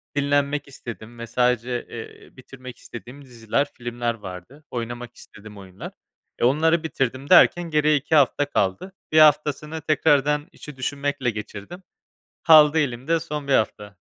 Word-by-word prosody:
dinlenmek 145 0 0
istedim 120 -3 -10
ve 115 - -7
sadece, 125 0 0
eee, 115 -1 -11
bitirmek 130 -1 -12
istediğim 125 +4 -11
diziler, 120 +3 -2
filmler 120 -1 -3
vardı. 105 - -11
Oynamak 120 0 -6
istediğim 105 0 -14
oyunlar, 95 -1 -10 0.5
e, - - -4
onları 160 +5 +2
bitirdim 135 -3 -3
derken 175 -2 +5
geriye 150 0 +2
2 150 +3 0
hafta 145 0 +3
kaldı. 100 - -1 0.2
1 155 - +5
haftasını 150 +1 +3
tekrardan 150 0 +1
işi 150 -2 -12
düşünmekle 140 -1 -2
geçirdim. 105 - -8 0.6
Kaldı 155 -1 +6
elimde 145 +4 -1
son 150 -3 -6
1 - - +1
hafta. 105 -2 -1
135 Hz, 135 wpm, -23 LUFS, 120-150 Hz, 0.6 s, Kaldı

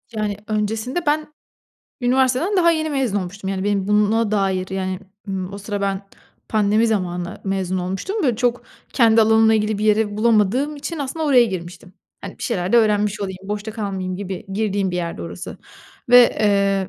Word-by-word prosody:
Yani, 210 -2 -2
öncesinde 220 +9 -2
ben 300 +1 +1 0.7
üniversiteden 260 +9 +2
daha 340 -2 +5
yeni 315 -1 -1
mezun 255 -8 0
olmuştum. 190 +1 -5
Yani, 190 0 -3
benim 200 -1 0
buna 210 +1 +2
dair, 190 -3 0
yani, 185 -1 -2 0.3
ımm, 190 0 -4
o 200 - -6
sıra 205 0 -4
ben 195 0 -1 0.5
pandemi 215 +1 +2
zamanı 180 -5 -2
mezun 190 -1 -1
olmuştum, 190 - -3
böyle, 245 -6 +1
çok 245 0 0 0.3
kendi 230 -3 +5
alanımla 220 0 +4
ilgili 215 -1 0
bir 215 - -2
yeri 210 -1 +2
bulamadığım 235 +6 +2
için 290 +3 -5
aslında 300 +3 -3
oraya 255 -4 +6
girmiştim. 180 -3 -7 0.3
Hani, - - -9
bir - - -9
şeyler 190 -4 -2
de - - +6
öğrenmiş 210 -2 +2
olayım, 190 -2 -4
boşta 210 +2 -4
kalmayayım 195 -4 -4
gibi 195 0 -6
girdiğim 200 -2 0
bir 180 - -3
yerdi 170 -1 -4
orası. - - -7 0.5
Ve, 245 0 +9 0.2
eee, 200 -2 +2
210 Hz, 170 wpm, -21 LUFS, 195-235 Hz, 0.7 s, Ve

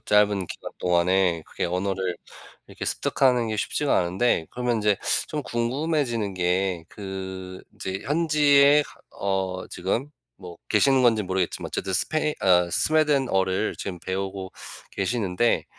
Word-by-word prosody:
짧은 105 -3 +2
기간 - - -8
동안에 90 -1 +2
그게 - - -4
언어를 90 0 -2 0.5
이렇게 - - -7
습득하는 125 -4 +1
게 110 - -2
쉽지가 145 +6 0
않은데 90 -1 +1
그러면 125 -1 -1
인제 105 -2 +2 0.3
좀 150 -1 -3
궁금해지는 120 - -1
게 90 -1 0
그 95 -2 -7
인제 95 +1 -4
현지에 150 -1 +4
가 - - -15 0.2
어 95 -2 -1
지금 105 +10 -2 0.3
뭐 90 -3 -10
계시는 130 +5 +4
건지 115 -3 +4
모르겠지만 95 -2 -2
어쨌든 95 - -3
스페인 155 - +1
어 90 -2 +4
스웨덴어를 130 - +2
지금 90 -3 -5
배우고 95 +1 -4 0.4
계시는데 100 +1 0
100 Hz, 305 characters per minute, -25 LUFS, 95-125 Hz, 0.5 s, 현지에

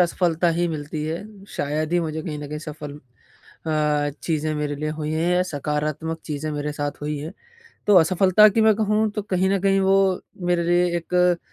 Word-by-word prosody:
असफलता 175 -1 +2
ही 175 - +2
मिलती 150 -1 -4
है, 160 +3 -3 0.3
शायद 155 +3 -2
ही 175 - +3
मुझे 160 -1 -3
कहीं 155 -3 -5
न 145 -1 -7
कहीं 150 0 -5
सफल 150 -1 -8 0.7
अ, - - 0 0.5
चीज़ें 155 -1 -1
मेरे 150 -1 -2
लिए 155 - -1
हुई 155 0 -3
हैं 165 +3 +1
या 180 - +3
सकारात्मक 150 0 -3
चीज़ें 155 0 -3
मेरे 150 0 -3
साथ 145 -1 -3
हुई 150 0 -2
हैं। 155 +3 -6 0.6
तो 205 - +5
असफलता 185 +5 +6
की 215 +2 +1
मैं 220 -1 +5
कहूँ 215 0 +1
तो 210 0 -4
कहीं 190 -2 0
न 195 - +2
कहीं 195 0 +3
वो 190 0 +3 0.6
मेरे 175 -1 +2
लिए 175 +1 +3
एक 180 +1 +2
160 Hz, 195 wpm, -23 LUFS, 150-180 Hz, 0.7 s, असफलता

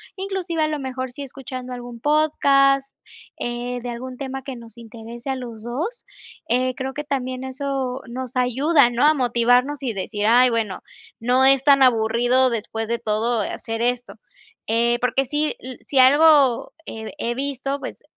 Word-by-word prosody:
inclusive 380 -4 -2
a 310 - +2
lo 305 -1 -3
mejor 260 -1 -5
si 285 - -9
escuchando 255 -1 -8
algún 240 -1 -8
podcast, 275 -2 +2 0.4
eh, 245 +1 -4
de 245 - -5
algún 250 +1 -7
tema 270 -1 -5
que 265 -2 -6
nos 230 -1 -13
interese 235 +2 -9
a 265 - 0
los 235 -4 -8
2. 315 - -4 0.4
Eh, 255 +2 +1
creo 265 0 -4
que 295 - -5
también 260 -3 -3
eso 265 -1 -3
nos 255 +1 -6
ayuda 260 +3 +3
¿no?, 245 +4 +1
a 305 - +6
motivarnos 250 +2 +2
y 235 -4 -1
decir: 205 +2 -3
"Ay, 245 +2 +6
bueno, 220 -5 -2 0.4
no 250 +3 +3
es 270 -1 +5
tan 275 -2 +6
aburrido 245 +2 +3
después 225 -1 -4
de 235 0 -1
todo 220 +1 0
eh, - - -4
hacer 225 0 -5
esto". 245 0 -1 0.5
Eh, 235 +1 +2
porque 250 +2 +1
si 295 +3 -1
l 255 0 -9
si 270 - +1
algo 280 -2 +5
he 220 0 -7
he 240 -3 -2
visto 275 0 -3
pues - - -7
255 Hz, 170 wpm, -22 LUFS, 235-275 Hz, 0.5 s, a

